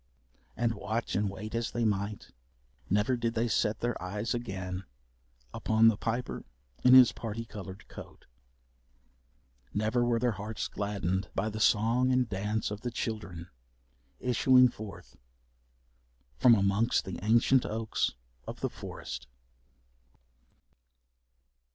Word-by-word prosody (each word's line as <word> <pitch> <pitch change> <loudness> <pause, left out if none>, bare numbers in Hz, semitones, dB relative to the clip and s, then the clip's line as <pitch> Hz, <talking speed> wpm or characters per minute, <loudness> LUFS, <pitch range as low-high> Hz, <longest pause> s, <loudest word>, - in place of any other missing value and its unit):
And 115 0 +1
watch 110 +2 -3
and 100 +2 +1
wait 105 +3 -7
as 115 -1 -1
they 120 -1 -1
might, 100 - -2 0.6
never 105 +6 +2
did 115 -1 -2
they 115 +1 +1
set 110 -1 0
their 120 0 -2
eyes 105 +5 -2
again 95 -5 -4 0.7
upon 110 +1 +4
the 115 - +1
Piper 120 +4 -3 0.4
in 125 0 +8
his 130 -2 +9
parti 115 0 -5
coloured 100 -3 -9
coat. - - -12 1.5
Never 110 +4 +1
were 120 -1 +2
their 120 +1 +1
hearts 105 +1 -4
gladdened 95 -2 -2
by 110 +3 0
the 110 0 -6
song 115 +5 +3
and 125 -1 +2
dance 105 +2 -2
of 105 0 -5
the 120 - -2
children 105 -7 -5 0.7
issuing 125 +1 +5
forth 110 -3 -10 1.2
from 120 -2 +7
amongst 100 +3 +2
the 95 - -5
ancient 120 +4 +4
oaks 110 0 -1 0.3
of - - -7
the - - -1
forest. - - -7
110 Hz, 125 wpm, -30 LUFS, 100-120 Hz, 1.5 s, his